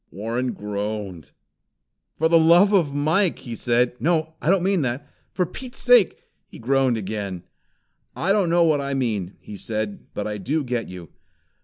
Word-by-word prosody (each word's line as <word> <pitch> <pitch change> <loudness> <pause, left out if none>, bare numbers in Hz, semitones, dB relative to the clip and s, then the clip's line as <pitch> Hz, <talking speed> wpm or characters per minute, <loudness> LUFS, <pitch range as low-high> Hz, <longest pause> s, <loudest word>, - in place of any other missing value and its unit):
Warren 115 +6 -3
groaned. 100 -6 -5 0.9
"For 160 - +3
the 165 0 +5
love 175 +6 +5
of 170 -8 +3
Mike!" 160 +6 +1
he 120 - -8
said. 120 +1 +1
"No, 160 -1 0
I - - 0
don't 190 -1 +3
mean 190 -2 +2
that! 135 +2 -3 0.2
For 180 - 0
Pete's 245 +8 -9
sake 245 -6 +4
" - - -49
He - - -11
groaned 130 0 +1
again. 100 -3 -5 0.7
"I 185 +5 0
don't 200 -4 +2
know 170 +1 +4
what 155 -3 +2
I 140 0 -3
mean," 105 -8 -2
he 105 - -9
said, 105 0 -4
"but 105 - -3
I 105 -1 -4
do 150 +10 -1
get 120 -3 -3
you. 90 -3 -10
135 Hz, 175 wpm, -23 LUFS, 105-170 Hz, 0.9 s, the